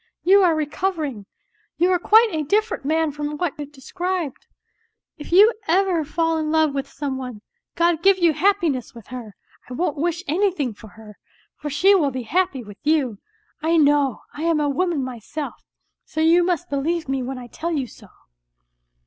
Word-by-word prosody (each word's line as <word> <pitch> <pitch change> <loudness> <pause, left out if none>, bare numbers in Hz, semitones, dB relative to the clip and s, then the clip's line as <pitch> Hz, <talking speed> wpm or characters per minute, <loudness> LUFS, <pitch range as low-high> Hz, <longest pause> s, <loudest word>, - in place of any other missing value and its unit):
You 390 +3 +6
are 345 -4 +4
recovering, 300 - -2 0.5
you 355 +3 +3
are 360 - +2
quite 440 +5 +5
a 315 -2 -1
different 420 +7 0
man 320 +1 +1
from 295 +1 -4
what 350 -2 -1
you 290 - -5
de 280 -2 -18
scribed. 355 -2 -4 0.7
If 295 - -9
you 415 +6 +7
ever 360 -1 +2
fall 325 +2 0
in 310 -1 -2
love 315 -2 +3
with 275 -1 -3
some 275 -2 -4
one, 250 -5 -7 0.3
God 340 -1 +2
give 390 +1 +5
you 340 -3 +3
happiness 340 - 0
with 230 - -13
her! 235 -5 -8 0.3
I - - -6
won't 300 +2 -1
wish 345 +3 -1
anything 320 - 0
for 220 +2 -14
her, 210 -1 -15 0.4
for 295 - -6
she 385 +8 +4
will 325 -8 +3
be 255 -2 -5
happy 300 0 0
with 205 -2 -13
you. 285 -9 +1 0.4
I 330 +2 +2
know, 290 -4 +3
I 295 - -8
am 330 -1 +2
a 295 - +1
woman 320 0 0
myself, 255 +4 -6 0.4
so 315 - -7
you 330 +2 +5
must 350 -1 -1
believe 320 +4 -1
me 270 0 -1
when 260 +1 -4
I 250 - -8
tell 325 +8 -5
you 285 -5 -1
so.'" 220 -3 -15
310 Hz, 185 wpm, -22 LUFS, 270-345 Hz, 0.7 s, you